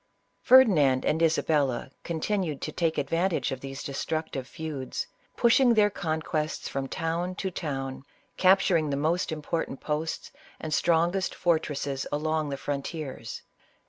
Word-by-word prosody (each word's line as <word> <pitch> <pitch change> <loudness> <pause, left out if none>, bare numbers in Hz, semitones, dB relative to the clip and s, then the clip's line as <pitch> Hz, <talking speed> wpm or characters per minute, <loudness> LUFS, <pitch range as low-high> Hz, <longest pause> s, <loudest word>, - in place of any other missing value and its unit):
Ferdinand 175 - +6
and 160 - +1
Isabella 145 -6 +1
continued 170 -2 -1
to 155 - -3
take 165 0 0
advantage 165 +5 0
of 130 - -3
these 135 +1 -7
destructive 140 -1 -3
feuds, 150 -4 -4 0.3
pushing 240 0 +5
their 210 -1 +4
conquests 155 -3 -2
from 135 -1 -3
town 170 +5 -2
to 190 -1 -3
town, 135 -6 -4 0.3
capturing 185 -4 +4
the 140 - -1
most 160 +5 0
important 155 -2 -3
posts 155 +1 -3 0.3
and 155 -1 -4
strongest 175 +4 +2
fortresses 145 -5 0
along 155 +1 0
the 140 - -3
frontiers. 145 +1 -5
155 Hz, 125 wpm, -27 LUFS, 140-175 Hz, 0.3 s, Ferdinand